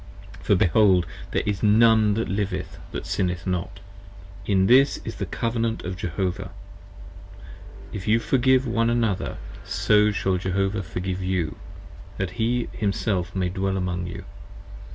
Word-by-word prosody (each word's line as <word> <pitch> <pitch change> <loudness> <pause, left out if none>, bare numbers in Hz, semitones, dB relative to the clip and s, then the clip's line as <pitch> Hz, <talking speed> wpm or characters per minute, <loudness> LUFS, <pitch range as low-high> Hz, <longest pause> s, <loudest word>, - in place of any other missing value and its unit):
for - - +3
behold, 95 0 +4 0.2
There - - -1
is 105 -2 -1
none 110 -1 +5
that 115 - -1
liveth 95 -2 -3
& - - -5
Sinneth 90 -2 -2
not! 90 -2 -3 0.7
And 95 -2 +3
this 135 +3 +5
is - - -6
the - - -3
Covenant 115 -1 -1
25 90 - -4
Of 90 - -10
Jehovah: 95 -1 -3 1.4
If 100 -1 -6
you 110 +2 +5
Forgive 130 +2 +2
one 115 -1 +1
another, 115 -5 0 0.3
so 105 0 +3
shall 95 -2 0
Jehovah 95 +2 -1
Forgive 90 +1 -4
You: 90 -4 -1 0.6
That 95 -2 -2
He 120 +1 +1
Himself 100 -3 -1
may 90 -2 0
Dwell 95 +1 -1
among 90 -1 -2
You. - - -7
100 Hz, 140 wpm, -24 LUFS, 90-110 Hz, 1.4 s, none